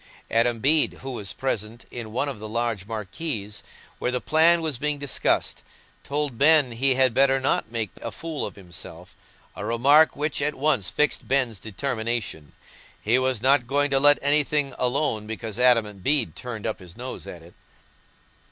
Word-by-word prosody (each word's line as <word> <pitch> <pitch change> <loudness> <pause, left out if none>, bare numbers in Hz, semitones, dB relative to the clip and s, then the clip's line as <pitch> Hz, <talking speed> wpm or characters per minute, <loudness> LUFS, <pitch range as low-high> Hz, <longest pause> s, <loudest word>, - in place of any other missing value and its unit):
Adam 115 +1 +2
Bede, 150 +6 +3
who 135 - -5
was 105 -6 -5
present 115 -3 -3
in 115 -3 -7
one 130 +6 -1
of 135 -6 -5
the 110 0 -7
large 115 -3 -2
marquees, 105 - -4 0.4
where - - -1
the 125 0 -1
plan 160 +6 +4
was 150 -6 -2
being 150 +1 -1
discussed, 140 -2 0 0.4
told 145 -4 -1
Ben 150 -3 +5
he 130 +3 +1
had 130 -2 +3
better 135 +1 +4
not 130 -4 0
make 115 -4 -3
a - - -5
fool 165 -2 -5
of - - -5
himself—a 90 -4 -10
remark 140 +7 +4
which 150 0 -2
at 150 +1 0
once 135 -9 +1
fixed 150 -1 0
Ben's 125 -6 0
determination: 110 - -4 0.5
he 115 +4 +2
was 130 -3 0
not 135 -2 +4
going 145 +2 +1
to 135 - +3
let 145 +1 +6
anything 145 -1 +1
alone 125 -4 0
because 110 0 -5
Adam 115 -5 +3
Bede 140 +3 0
turned 115 -4 -6
up 110 - -2
his 90 +1 -13
nose 125 +2 -7
at 85 -2 -9
it. 85 - -16
125 Hz, 170 wpm, -24 LUFS, 110-145 Hz, 0.5 s, let